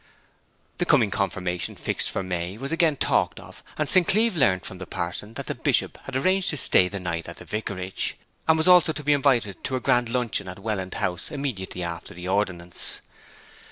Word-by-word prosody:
The - - +1
coming 105 - +4
confirmation, 90 -3 -2
fixed - - -1
for - - -3
May, 90 +1 -3
was 135 +5 -4
again 165 -2 +3
talked - - +1
of; - - -13 0.2
and 150 - 0
St. 185 +1 +5
Cleeve 220 0 +3
learnt 95 - +2
from 95 - -8
the 95 - -7
parson 95 +6 -4
that - - -5
the - - -2
Bishop - - +1
had 135 - -6
arranged 185 +7 +2
to 150 - -2
stay 90 -7 +5
the 100 +1 -5
night 85 -2 -4
at 85 - -9
the - - -10
vicarage, 95 -3 -3 0.3
and 160 0 +5
was 180 +2 +7
to 155 -1 -2
be 150 +1 +3
invited 130 -8 +1
to 130 - -1
a - - 0
grand 120 -1 +2
luncheon 115 -5 -1
at 90 - -7
Welland 100 -2 -3
House 90 +1 -2
immediately 125 - -4
after 85 -1 -6
the 90 +1 -7
ordinance. 90 -3 0
105 Hz, 195 wpm, -25 LUFS, 90-140 Hz, 0.3 s, was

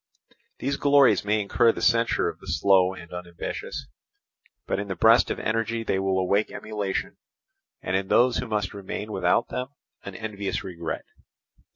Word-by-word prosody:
These 140 0 -2
glories 140 -7 +4
may 105 +1 +1
incur 115 +3 +3
the - - -7
censure 115 0 +3
of - - -5
the - - -15
slow 95 -1 +3
and 85 -2 -11
unambitious; 90 -1 -6 0.8
but - - -1
in 100 - -4
the 95 - -3
breast 115 +7 +5
of - - -2
energy 115 +1 -1
they 95 -3 0
will 95 0 0
awake 100 +3 +1
emulation, 105 -3 -4 0.7
and 95 - -1
in 95 0 0
those 125 +4 +4
who - - -3
must 105 -3 -2
remain 100 +2 -6
without 95 +3 +1
them 125 0 -3 0.4
an 100 - -8
envious 100 -2 -4
regret. 85 -4 -5
100 Hz, 165 wpm, -25 LUFS, 95-115 Hz, 0.8 s, breast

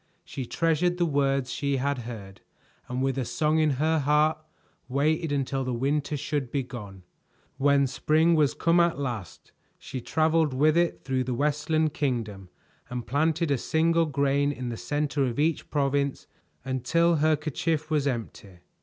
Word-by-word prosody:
She 130 -3 -6
treasured 165 +2 +1
the 175 - +2
words 135 -4 0
she 140 -1 -1
had 140 +1 -1
heard, 110 -5 -9 0.5
and 125 +1 -2
with 135 0 0
a - - 0
song 155 +5 +1
in 155 -1 +3
her 160 +3 +2
heart, 150 +2 +2 0.5
waited 150 +4 0
until 135 -1 -1
the 125 -1 -2
winter 145 +4 -1
should 140 -2 -2
be 135 +1 -1
gone. 100 -7 -9 0.5
When 140 0 +3
spring 155 +5 +2
was 150 -4 +2
come 170 +1 +3
at 170 -3 +3
last, 120 - -6 0.3
she 130 - -7
traveled 155 0 +1
with 150 +4 +3
it 170 0 +1
through 130 -1 -1
the 125 -1 -2
Westland 150 +3 0
Kingdom 115 - -3 0.4
and 125 -1 -5
planted 160 +3 +1
a 135 - +1
single 165 +3 +2
grain 140 0 +1
in 130 -3 -5
the 120 - -4
center 145 +3 -1
of 120 -1 -3
each 155 +2 0
province, 140 -1 0 0.4
until 155 +6 +2
her 155 +1 +3
kerchief 155 +1 -2
was 145 -2 +1
empty. 105 -7 -5
145 Hz, 165 wpm, -27 LUFS, 130-155 Hz, 0.5 s, in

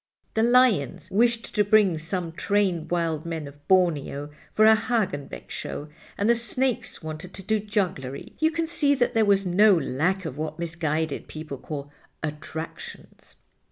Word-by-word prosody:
The 220 - +1
lions 225 - +3
wished 235 +3 +1
to 210 - +3
bring 205 -5 +4
some 165 +1 -3
trained 185 -1 0
Wild 165 -3 -1
Men 165 -3 -4
of 145 +1 -15
Borneo 150 -6 +1 0.2
for 215 - +4
a 220 - +8
Hagenbeck 215 - -2
show, 150 - -5 0.3
and 200 - +1
the 235 - +6
snakes 240 -3 +1
wanted 155 +3 -7
to 195 - -7
do 220 +3 +1
jugglery. 185 - -3
You 315 - +4
can 330 0 -1
see 290 -3 +2
that 245 -2 +1
there 225 -1 +3
was 200 -1 +3
no 200 +3 +5
lack 170 +6 0
of 150 -2 -5
what 155 0 -4
misguided 160 -2 -2
people 155 -4 -7
call 145 -2 -6 0.3
'attractions. 155 +1 -7
180 Hz, 155 wpm, -25 LUFS, 155-215 Hz, 0.3 s, a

